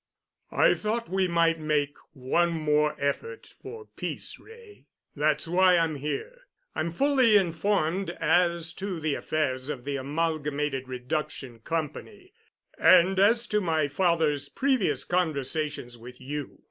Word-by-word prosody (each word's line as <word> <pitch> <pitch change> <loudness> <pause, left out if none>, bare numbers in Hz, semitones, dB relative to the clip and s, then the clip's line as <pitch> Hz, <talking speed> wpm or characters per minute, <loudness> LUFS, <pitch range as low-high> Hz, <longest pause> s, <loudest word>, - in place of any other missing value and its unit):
"I - - +5
thought 230 +2 -3
we 190 -1 +2
might 165 -1 +2
make 150 -2 0 0.2
one 165 +6 +1
more 150 -1 +1
effort 425 - -4
for 445 -1 -9
peace, - - -6
Wray. 450 -2 -16 0.3
That's 150 +1 +1
why 180 +1 +4
I'm 165 -3 0
here. 450 - -5 0.3
I'm 165 - -2
fully 255 - +4
informed 190 0 0
as 170 -2 +2
to 190 -4 -3
the 155 -2 -1
affairs 135 -3 -2
of 135 -4 -5
the 140 -1 -2
Amalgamated 150 -2 -2
Reduction 125 -1 -4
Company 165 - -5 0.5
and 185 +1 +6
as 230 +4 +4
to 210 0 +1
my 160 -5 +1
father's 150 -3 +1
previous 260 - 0
conversations 150 -6 -2
with 125 +2 -12
you. 145 +1 -6
160 Hz, 130 wpm, -27 LUFS, 145-190 Hz, 0.5 s, and